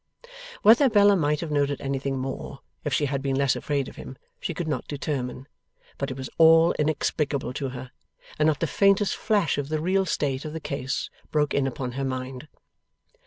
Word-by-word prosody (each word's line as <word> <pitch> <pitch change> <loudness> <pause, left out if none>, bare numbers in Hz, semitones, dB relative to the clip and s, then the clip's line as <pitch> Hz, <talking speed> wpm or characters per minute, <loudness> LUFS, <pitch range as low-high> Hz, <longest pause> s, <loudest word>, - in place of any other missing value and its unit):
Whether 240 +6 +7
Bella 205 -2 +5
might 150 -4 +1
have 165 -3 -4
noted 145 -1 +1
anything 135 0 -2
more, 135 +1 -5 0.2
if 145 - -2
she 145 +2 +2
had 140 -1 -2
been 135 -1 -1
less 140 -1 +2
afraid 140 -3 -1
of - - -11
him, 130 - -9 0.2
she - - -3
could 170 0 -4
not 150 - -2
determine; 135 -3 -4 0.5
but 140 - -2
it 130 - -6
was 130 -1 -5
all 165 +1 +7
inexplicable 150 -3 0
to 135 0 -3
her, 125 0 -8 0.5
and 155 - +4
not 155 -2 +1
the - - +3
faintest 200 +4 +3
flash 205 -8 +1
of 140 0 -4
the 155 0 -1
real 190 +4 +1
state 135 -4 -1
of 155 -1 -6
the 160 - -4
case 135 -3 -3 0.2
broke 150 -1 +1
in 140 -1 +1
upon 125 -1 -4
her 135 +3 -4
mind. 130 +1 -4
145 Hz, 195 wpm, -25 LUFS, 135-160 Hz, 0.5 s, Whether